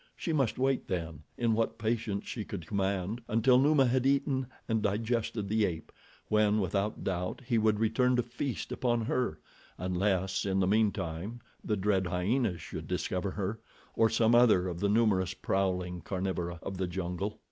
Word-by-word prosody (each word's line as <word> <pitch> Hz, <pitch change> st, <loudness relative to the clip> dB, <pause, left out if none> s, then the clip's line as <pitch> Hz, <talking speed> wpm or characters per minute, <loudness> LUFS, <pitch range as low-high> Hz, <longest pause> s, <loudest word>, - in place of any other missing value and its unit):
She 165 Hz, -, -3 dB
must 135 Hz, -7 st, +1 dB
wait 135 Hz, +1 st, +1 dB
then, 85 Hz, -5 st, -3 dB, 0.2 s
in 115 Hz, -2 st, +2 dB
what 115 Hz, +1 st, 0 dB
patience 110 Hz, -2 st, -1 dB
she 110 Hz, -, -4 dB
could 95 Hz, -5 st, -6 dB
command, 100 Hz, +4 st, -1 dB
until 120 Hz, +3 st, +4 dB
Numa 140 Hz, 0 st, +5 dB
had 125 Hz, +1 st, +2 dB
eaten 135 Hz, -1 st, +1 dB, 0.2 s
and 110 Hz, -2 st, +1 dB
digested 110 Hz, 0 st, -1 dB
the 110 Hz, +2 st, +2 dB
ape, 80 Hz, -5 st, -2 dB, 0.4 s
when, 105 Hz, 0 st, +3 dB
without 100 Hz, +2 st, -1 dB
doubt, 90 Hz, -1 st, -2 dB
he 120 Hz, -2 st, +2 dB
would 110 Hz, -1 st, +2 dB
return 120 Hz, +3 st, +2 dB
to 125 Hz, -, +2 dB
feast 120 Hz, +2 st, -4 dB
upon 120 Hz, -2 st, 0 dB
her, 115 Hz, -6 st, -1 dB, 0.4 s
unless, 95 Hz, +1 st, 0 dB
in 95 Hz, -1 st, 0 dB
the 95 Hz, -, +3 dB
meantime, 100 Hz, 0 st, 0 dB, 0.2 s
the 105 Hz, -, 0 dB
dread 95 Hz, -1 st, +1 dB
hyenas 90 Hz, +2 st, 0 dB
should -, -, -7 dB
discover 95 Hz, +2 st, -1 dB
her, 100 Hz, +3 st, -3 dB, 0.4 s
or 115 Hz, 0 st, +4 dB
some 115 Hz, +1 st, +3 dB
other 110 Hz, -7 st, +5 dB
of 85 Hz, -2 st, -4 dB
the 100 Hz, -, +1 dB
numerous 100 Hz, -4 st, +2 dB
prowling 90 Hz, -2 st, -1 dB
carnivora 90 Hz, -2 st, -3 dB
of 95 Hz, -, -5 dB
the 95 Hz, -, 0 dB
jungle. 90 Hz, +3 st, -3 dB
105 Hz, 170 wpm, -30 LUFS, 95-115 Hz, 0.4 s, Numa